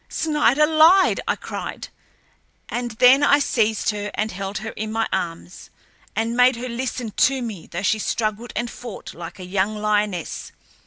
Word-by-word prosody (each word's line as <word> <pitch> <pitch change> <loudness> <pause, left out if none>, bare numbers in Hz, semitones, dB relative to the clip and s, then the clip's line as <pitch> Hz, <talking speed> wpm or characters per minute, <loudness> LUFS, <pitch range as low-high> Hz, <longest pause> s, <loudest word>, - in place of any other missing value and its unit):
"Snider 300 -2 +2
lied!" 320 +5 +5
I - - +2
cried. - - -6 0.8
And 240 0 -3
then 250 +5 +6
I 285 0 +5
seized 220 -7 +1
her 205 0 -4
and 215 +1 -1
held 195 +2 -5
her 220 +1 -5
in 215 +1 -5
my 225 0 0
arms, 170 +1 -5 0.5
and 225 +1 -1
made 250 +1 +5
her 250 +2 -5
listen 240 -1 -4
to 265 +5 +2
me, 220 -8 -6
though 175 +3 -5
she 215 +2 +2
struggled 215 +2 -2
and 235 +2 -1
fought 240 -4 -9
like 170 +2 -9
a 185 - -8
young 195 +3 -1
lioness. 210 -4 -1
220 Hz, 165 wpm, -22 LUFS, 205-250 Hz, 0.8 s, then